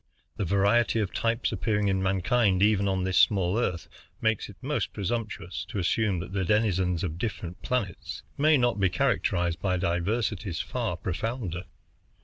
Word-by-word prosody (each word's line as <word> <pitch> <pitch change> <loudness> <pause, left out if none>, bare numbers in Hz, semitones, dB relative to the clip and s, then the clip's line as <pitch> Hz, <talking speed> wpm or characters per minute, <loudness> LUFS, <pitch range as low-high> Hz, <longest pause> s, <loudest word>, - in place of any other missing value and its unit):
The 100 - -1
variety 100 +6 +3
of 105 -3 -1
types 115 +1 0
appearing 105 0 0
in 95 -1 +1
mankind 95 +1 +2
even 100 -1 +3
on 95 -1 0
this 95 0 +2
small 95 0 +3
Earth 90 -8 -1 0.3
makes 110 -2 0
it 100 - -11
most 145 +3 -2
presumptuous 105 -3 -3
to 115 - -6
assume 95 +2 +1
that 95 - -8
the 95 -1 0
denizens 95 -4 +1
of 85 -2 -3
different 90 -5 -4
planets 115 -8 -3
may 155 +1 +4
not 120 -4 +1
be 95 -1 +3
characterized 90 -7 0
by 95 -2 +1
diversities 95 +1 -1
far - - -2
profounder. 95 -2 -3
100 Hz, 155 wpm, -27 LUFS, 90-115 Hz, 0.3 s, may